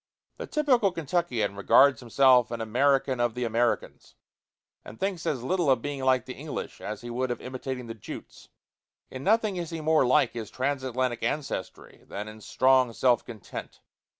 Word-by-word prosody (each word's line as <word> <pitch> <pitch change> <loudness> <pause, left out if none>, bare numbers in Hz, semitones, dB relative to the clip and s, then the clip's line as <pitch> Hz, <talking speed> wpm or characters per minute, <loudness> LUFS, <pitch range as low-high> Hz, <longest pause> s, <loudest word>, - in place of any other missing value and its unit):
The - - -6
typical 255 -10 +2
Kentuckian 150 - -1
regards 130 +6 +5
himself 125 0 +4
an 120 0 -4
American 130 +3 +1
of 120 -1 0
the 125 - -2
Americans, 115 0 -1 0.7
and 110 - -12
thinks 190 -4 -2
as 130 -5 -1
little 175 +1 +1
of 130 -3 +3
being 145 -2 -4
like 130 -3 +3
the 130 - -6
English 145 +2 -7
as 105 0 -5
he 120 0 -7
would 130 +2 -1
of 120 - -3
imitating 130 0 -5
the 115 - -6
Jutes. 110 - -10 0.6
In 130 0 -7
nothing 215 -1 +2
is 170 -2 -4
he 165 - -5
more 155 -1 +3
like 130 -1 +3
his 115 -3 -6
transatlantic 130 -2 -2
ancestry 140 -11 -4
than 105 +1 -6
in 110 0 -10
strong 130 +1 +3
self 120 -1 +2
content. 110 -5 -9
130 Hz, 170 wpm, -27 LUFS, 120-145 Hz, 0.7 s, regards